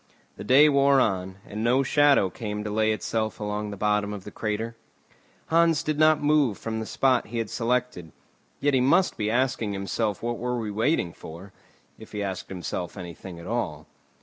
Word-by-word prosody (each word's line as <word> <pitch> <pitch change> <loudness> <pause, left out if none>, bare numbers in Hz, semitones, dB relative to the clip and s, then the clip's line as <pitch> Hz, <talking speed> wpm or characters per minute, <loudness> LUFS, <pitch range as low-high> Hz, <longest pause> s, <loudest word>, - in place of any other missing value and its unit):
The - - -8
day 135 +7 +6
wore 140 -1 +4
on, 95 -5 0
and 105 +1 -5
no 125 +3 +3
shadow 140 -8 +4
came 105 0 -5
to 105 - -4
lay 110 +1 +2
itself 110 0 -2
along 105 0 -3
the 100 - -7
bottom 105 0 0
of 100 -2 -7
the - - -9
crater. 110 +2 -3 0.7
Hans 165 -2 +3
did 155 -1 -2
not 155 -1 +4
move 145 -7 +3
from 110 0 -4
the 110 - -5
spot 130 -2 +1
he 120 - -5
had 115 -2 -2
selected; 120 -8 -1 0.5
yet 145 0 +1
he 130 - +3
must 170 +9 +3
be 105 -1 -1
asking 120 -3 0
himself 100 +1 -2
what 120 0 -2
were 125 0 -2
we 110 -3 -3
waiting 110 - 0
for, 90 +5 -11 0.5
if - - -13
he 105 -1 -2
asked 95 -2 -5
himself 90 0 -5
anything 90 0 -8
at 85 - -10
all. 80 -9 -3
110 Hz, 190 wpm, -26 LUFS, 100-130 Hz, 0.7 s, day